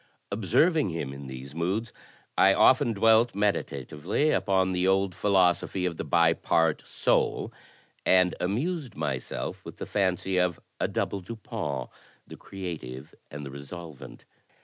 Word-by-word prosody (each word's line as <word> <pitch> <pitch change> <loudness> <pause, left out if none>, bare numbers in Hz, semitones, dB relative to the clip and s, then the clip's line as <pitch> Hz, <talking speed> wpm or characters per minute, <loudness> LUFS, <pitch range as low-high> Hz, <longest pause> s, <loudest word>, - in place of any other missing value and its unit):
Observ 120 - +3
ing 150 -11 +1
him 80 -5 -4
in 70 0 -9
these 65 +1 -8
moods, 95 +7 -2 0.4
I 95 0 +5
often 130 -2 +5
dwelt 115 +2 +4
meditatively 95 - 0
upon 95 -1 +2
the 90 0 +1
old 95 0 +2
philosophy 95 -1 +2
of 85 -3 -2
the - - -3
Bi 85 -1 +4
Part 80 -1 +1
Soul, - - 0 0.5
and 90 -1 +4
amused 135 - -2
myself - - -4
with - - -10
the - - -5
fancy 95 -1 0
of 90 -2 +1 0.2
a - - +1
double 100 - -2
Dupin 95 - -5 0.2
— - - -31
the - - -7
creative 80 -7 -7 0.2
and 75 0 -7
the 70 - -7
resolvent. 75 +1 -10
90 Hz, 145 wpm, -27 LUFS, 80-105 Hz, 0.5 s, I